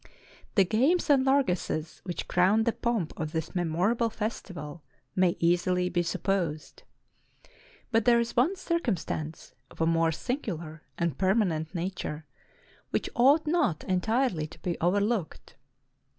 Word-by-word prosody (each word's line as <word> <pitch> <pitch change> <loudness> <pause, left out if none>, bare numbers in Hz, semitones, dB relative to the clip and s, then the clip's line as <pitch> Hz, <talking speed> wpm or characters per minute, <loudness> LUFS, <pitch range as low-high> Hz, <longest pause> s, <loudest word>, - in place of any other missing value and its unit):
The 195 - +5
games 270 - +2
and 270 -2 +5
largesses 185 - 0
which 175 -2 -4
crowned 195 +5 +3
the 235 - +3
pomp 225 -8 -1
of 155 -2 -3
this 160 -1 -3
memorable 185 +7 +1
festival 180 -8 -5 0.3
may 185 -2 +2
easily 180 +1 +2
be 175 -1 +1
sup 175 +1 -4
posed; 175 -6 -2 1.1
but 225 -2 +2
there 235 -1 +5
is 235 0 -2
one 280 +11 +3
circumstance 225 - -3 0.2
of - - -17
a 165 - +2
more 165 0 +2
singular 165 - -4 0.2
and 170 -6 -1
permanent 185 -4 +1
nature, 170 -3 -4 0.6
which - - -2
ought 280 +6 +5
not 300 - +1
entirely 190 - 0
to - - -14
be 175 -3 -1
overlooked. 200 +1 -1
185 Hz, 135 wpm, -28 LUFS, 165-235 Hz, 1.1 s, The